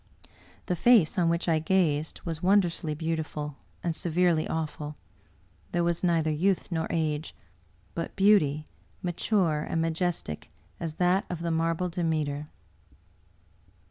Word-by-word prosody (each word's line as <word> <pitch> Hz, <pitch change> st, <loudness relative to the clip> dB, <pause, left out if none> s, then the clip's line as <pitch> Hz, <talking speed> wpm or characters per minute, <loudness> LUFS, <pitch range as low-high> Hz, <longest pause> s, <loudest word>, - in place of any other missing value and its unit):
The 180 Hz, -, 0 dB
face 215 Hz, -3 st, +5 dB
on 170 Hz, -2 st, +3 dB
which 170 Hz, +1 st, 0 dB
I 160 Hz, -2 st, +3 dB
gazed 160 Hz, -3 st, +1 dB
was 165 Hz, -2 st, -4 dB
wondrously 180 Hz, -5 st, +2 dB
beautiful, 155 Hz, -2 st, -3 dB, 0.3 s
and 170 Hz, -2 st, -1 dB
severely 170 Hz, -1 st, +2 dB
awful. 150 Hz, -2 st, -3 dB, 0.8 s
There 175 Hz, -, +2 dB
was 170 Hz, +1 st, 0 dB
neither 165 Hz, -3 st, +2 dB
youth 185 Hz, +5 st, +1 dB
nor 160 Hz, -1 st, -1 dB
age, 155 Hz, -1 st, -1 dB, 0.6 s
but 165 Hz, -, -4 dB
beauty, 175 Hz, -7 st, +4 dB, 0.4 s
mature 175 Hz, -3 st, +1 dB
and 165 Hz, -, -2 dB
majestic 165 Hz, -, -2 dB, 0.3 s
as 160 Hz, -2 st, -4 dB
that 180 Hz, +3 st, +2 dB
of 170 Hz, -2 st, -4 dB
a 170 Hz, -, 0 dB
marble 165 Hz, +2 st, +1 dB
Demeter. 155 Hz, -4 st, -1 dB
165 Hz, 125 wpm, -28 LUFS, 155-175 Hz, 0.8 s, face